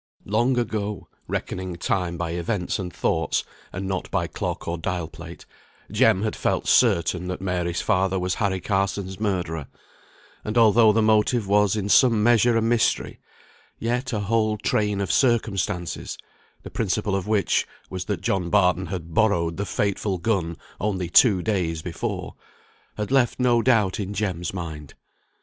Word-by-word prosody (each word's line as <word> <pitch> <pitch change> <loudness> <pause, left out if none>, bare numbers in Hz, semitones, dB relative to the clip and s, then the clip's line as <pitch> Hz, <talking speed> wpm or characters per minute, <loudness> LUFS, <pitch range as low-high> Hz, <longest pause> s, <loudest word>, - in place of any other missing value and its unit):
Long 120 +5 +1
ago 105 -4 -3 0.2
(reckoning 95 -1 -4
time 85 0 -1
by 85 -1 -3
events 90 +2 -2
and 90 -2 -4
thoughts, - - 0 0.3
and 95 +2 -5
not 95 -1 -3
by - - 0
clock - - -4
or 85 0 -2
dial 90 -1 -2
plate), 85 +1 -11 0.5
Jem 95 - +3
had 110 - -1
felt - - -1
certain 90 -6 +3
that 90 0 -4
Mary's 90 -2 -2
father 95 +1 +1
was 90 0 -1
Harry 100 -4 -1
Carson's 95 0 -2
murderer; 90 -8 -2 0.8
and 105 +2 -3
although 115 -1 +6
the 110 +1 +2
motive 110 +1 +2
was 105 0 +3
in 105 -2 -2
some 115 0 +5
measure 120 0 +4
a 115 - +1
mystery, 115 -3 +1 0.6
yet 125 +3 -2
a 110 -3 -1
whole 110 +1 +1
train 105 -1 0
of 95 - -1
circumstances 105 -8 0 0.5
(the - - -9
principal 105 -1 -1
of 95 0 -3
which 105 -2 +1 0.2
was 95 -1 -4
that 105 - -3
John 95 -7 -1
Barton 90 -1 +2
had 85 -2 -6
borrowed 85 -6 +2
the 100 0 -3
fatal 100 -1 -1
gun 85 -4 -1 0.2
only 95 -4 -2
two 95 -2 +5
days 85 -7 -1
before) 90 - -4 0.6
had 105 +3 -3
left 130 -3 +2
no 120 -2 +3
doubt 110 -7 +2
in 100 0 -4
Jem's 90 -5 -2
mind. 80 -6 -7
100 Hz, 155 wpm, -24 LUFS, 90-110 Hz, 0.8 s, although